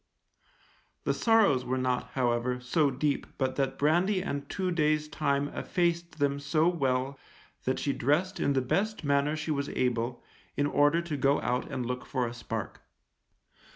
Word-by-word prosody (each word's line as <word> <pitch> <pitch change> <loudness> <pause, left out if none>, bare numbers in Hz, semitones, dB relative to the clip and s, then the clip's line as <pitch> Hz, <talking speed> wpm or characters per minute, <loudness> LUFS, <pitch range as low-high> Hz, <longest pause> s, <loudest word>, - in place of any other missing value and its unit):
The - - +1
sorrows 215 - +4
were 130 +1 -1
not, 130 -1 -1
however, 125 -1 0
so 140 +4 +2
deep 140 +2 -1
but 130 -1 0
that 135 -1 0
brandy 180 +6 +2
and 140 -6 -4
two 185 -2 -1
days' 155 -2 +1
time 145 -2 0
effaced 170 0 -1
them 140 -1 +1
so 155 +3 +2
well 135 -5 0 0.5
that 130 - +1
she 140 - -1
dressed 175 +8 0
in 140 - +2
the 135 - +2
best 205 +10 -1
manner 140 +1 +2
she 155 0 -3
was 140 -1 -1
able, 120 -1 -1 0.3
in 145 - +2
order 145 +3 +3
to 160 -4 -3
go 140 +1 +3
out 125 +1 -1
and 130 -3 -2
look 125 +1 -4
for 130 -2 0
a 115 - -4
spark. 120 - -5
140 Hz, 165 wpm, -29 LUFS, 130-160 Hz, 0.5 s, sorrows